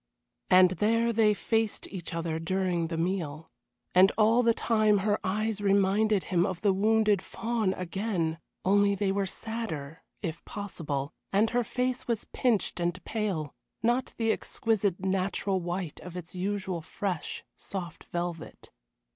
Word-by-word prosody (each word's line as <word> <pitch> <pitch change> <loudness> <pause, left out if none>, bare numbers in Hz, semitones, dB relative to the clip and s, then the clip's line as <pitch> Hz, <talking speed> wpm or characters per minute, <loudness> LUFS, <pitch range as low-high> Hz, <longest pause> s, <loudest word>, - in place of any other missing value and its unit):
And 185 0 +7
there 230 +5 +2
they 210 -1 +4
faced 225 0 0
each 180 -5 -6
other 165 -1 -2
during 175 0 0
the 165 0 -3
meal, 165 -3 -2 0.4
and 185 +2 +7
all 225 +2 +5
the 235 -1 +4
time 215 -2 +3
her 210 -1 +2
eyes 210 +2 -1
reminded 200 +1 +3
him 175 -2 +2
of 185 -2 -2
the 200 -2 +4
wounded 210 0 +3
fawn 225 -4 -1
again, 180 -3 -2 0.3
only 200 +1 +4
they 195 0 0
were 195 0 0
sadder, 185 -9 -5 0.2
if 165 -3 -4
possible, 160 -8 -4 0.2
and 210 +3 +3
her 245 0 +2
face 250 +2 -2
was 230 -3 -1
pinched 230 -7 +1
and 175 +1 -2
pale, 195 -10 -2 0.3
not 240 +2 +1
the 225 -1 +2
exquisite 210 -6 0
natural 190 0 0
white 175 -2 -4
of 180 0 -8
its 175 -1 -8
usual 190 -1 -2
fresh, 180 +2 -4
soft 175 -4 -7
velvet. 175 -2 -5
195 Hz, 145 wpm, -29 LUFS, 175-215 Hz, 0.4 s, And